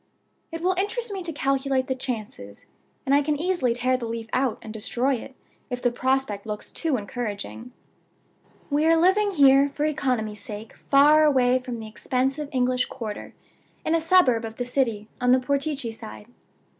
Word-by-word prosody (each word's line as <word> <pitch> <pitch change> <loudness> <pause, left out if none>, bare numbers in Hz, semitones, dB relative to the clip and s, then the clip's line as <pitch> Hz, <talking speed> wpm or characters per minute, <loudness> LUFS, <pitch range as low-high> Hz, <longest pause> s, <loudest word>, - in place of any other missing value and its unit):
"It 330 0 -5
will 370 +1 +3
interest 430 +3 -1
me 385 - -4
to 340 -2 0
calculate 270 -2 0
the 265 - -1
chances; 220 - -6 0.4
and 270 - +2
I 285 - +5
can 295 0 -1
easily 325 -9 +1
tear 255 +1 +1
the 235 -2 -5
leaf 225 0 -5
out, 255 -2 +1
and 215 - -8
destroy 245 +5 0
it, 260 +2 -6 0.3
if 250 -1 -3
the 245 - +1
prospect 255 -5 -1
looks 210 -1 -6
too 315 -6 -1
encouraging. 225 +2 -5 1.0
"We 295 +2 +2
are 330 0 +5
living 380 +5 +3
here 280 -5 +5
(for 290 +2 -2
economy's 250 -8 -1
sake) 215 +1 -8
far 295 +2 +5
away 255 -4 +4
from 250 -1 -6
the 225 -1 -7
expensive 265 +6 -2
English 250 -1 +1
quarter, 220 -5 -7 0.5
in 315 - +1
a 330 - +3
suburb 320 -9 +4
of 225 0 -6
the 245 - -3
city, 235 -5 -1
on 250 0 +4
the 260 - +5
Portici 280 -2 -2
side. 105 - -10
260 Hz, 175 wpm, -25 LUFS, 230-295 Hz, 1.0 s, I